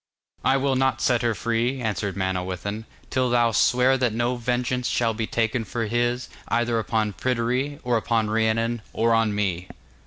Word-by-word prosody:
'I 135 Hz, -, +3 dB
will 135 Hz, 0 st, +1 dB
not 130 Hz, 0 st, +1 dB
set 120 Hz, -2 st, +2 dB
her 115 Hz, -2 st, +1 dB
free,' 120 Hz, +4 st, -1 dB
answered 105 Hz, -4 st, -2 dB
Manawyddan, 95 Hz, +3 st, -3 dB, 0.3 s
'till 130 Hz, -1 st, +1 dB
thou 120 Hz, -1 st, +3 dB
swear 125 Hz, +4 st, +3 dB
that 125 Hz, -4 st, +1 dB
no 120 Hz, +2 st, 0 dB
vengeance 125 Hz, +1 st, -1 dB
shall 115 Hz, -2 st, +1 dB
be 110 Hz, 0 st, -3 dB
taken 115 Hz, +1 st, 0 dB
for 115 Hz, +1 st, -3 dB
his, 120 Hz, +3 st, 0 dB, 0.2 s
either 120 Hz, -1 st, +1 dB
upon 110 Hz, -2 st, -1 dB
Pryderi, 125 Hz, +5 st, -1 dB
or 125 Hz, -2 st, +2 dB
upon 110 Hz, -1 st, 0 dB
Rhiannon, 115 Hz, +1 st, 0 dB
or 115 Hz, +1 st, +2 dB
on 115 Hz, -2 st, +2 dB
me. 95 Hz, -3 st, -1 dB
115 Hz, 165 wpm, -24 LUFS, 110-125 Hz, 0.3 s, I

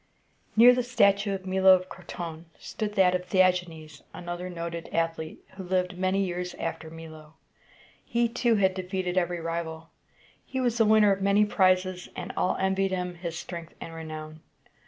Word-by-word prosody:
Near 240 Hz, +3 st, +8 dB
the 250 Hz, -, +1 dB
statue 205 Hz, -5 st, +2 dB
of 190 Hz, -1 st, -8 dB
Milo 190 Hz, 0 st, +6 dB
of 185 Hz, 0 st, -4 dB
Croton 170 Hz, -3 st, -8 dB
stood 210 Hz, -1 st, -5 dB
that 185 Hz, -2 st, +4 dB
of 180 Hz, 0 st, -3 dB
The 190 Hz, -, -1 dB
ag´e 180 Hz, -1 st, +4 dB
nes, 155 Hz, -3 st, -12 dB
another 175 Hz, +1 st, -5 dB
noted 170 Hz, -1 st, -5 dB
athlete, 165 Hz, -1 st, -2 dB
who 190 Hz, 0 st, -9 dB
lived 180 Hz, 0 st, -1 dB
many 190 Hz, +2 st, +1 dB
years 180 Hz, 0 st, -4 dB
after 160 Hz, -, -5 dB
Milo. 160 Hz, -1 st, -12 dB, 0.7 s
He 235 Hz, 0 st, +1 dB
too 235 Hz, 0 st, +1 dB
had 190 Hz, -2 st, +3 dB
defeated 185 Hz, -1 st, -3 dB
every 175 Hz, -1 st, 0 dB
rival. 165 Hz, -1 st, -5 dB, 0.5 s
He 260 Hz, -, -5 dB
was 240 Hz, -2 st, 0 dB
the 225 Hz, -, +5 dB
winner 215 Hz, -1 st, +5 dB
of 195 Hz, 0 st, 0 dB
many 200 Hz, +2 st, +4 dB
prizes, 185 Hz, -2 st, +1 dB
and 180 Hz, -, -6 dB
all 180 Hz, -, 0 dB
envied 190 Hz, 0 st, +1 dB
him 180 Hz, -1 st, -3 dB
his 170 Hz, -1 st, -6 dB
strength 170 Hz, -1 st, -8 dB
and 165 Hz, -, -8 dB
renown. 155 Hz, -1 st, -8 dB
180 Hz, 175 wpm, -27 LUFS, 170-195 Hz, 0.7 s, Near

